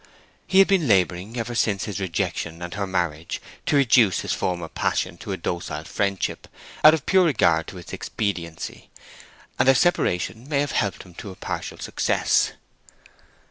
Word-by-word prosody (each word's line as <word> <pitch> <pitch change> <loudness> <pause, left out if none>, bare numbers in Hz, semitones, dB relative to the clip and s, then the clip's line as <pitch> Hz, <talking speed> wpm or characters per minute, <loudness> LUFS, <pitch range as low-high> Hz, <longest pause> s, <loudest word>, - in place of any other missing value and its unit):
He 190 - +2
had 195 - +8
been 185 -7 +2
laboring 95 +2 +1
ever 120 +1 -3
since 105 -4 +1
his 105 -2 -4
rejection 85 -2 -3
and 85 - -6
her 100 -1 -2
marriage 85 -4 -2 0.3
to - - +2
reduce 120 -8 +4
his - - -2
former 85 -2 -2
passion - - -1
to - - -6
a - - -2
docile 85 -1 -4
friendship, 100 -2 -2 0.4
out 155 +1 +9
of 155 - -7
pure 190 -1 +4
regard 85 - +3
to 95 - -8
its 90 - -10
expediency; 85 -6 -4 0.7
and - - +3
their 135 - +7
separation 120 - +1
may 140 -2 +2
have 145 - -2
helped 100 -2 -1
him 90 - -16
to 100 - -8
a 95 - -9
partial - - -5
success. - - +1
100 Hz, 170 wpm, -24 LUFS, 90-130 Hz, 0.7 s, out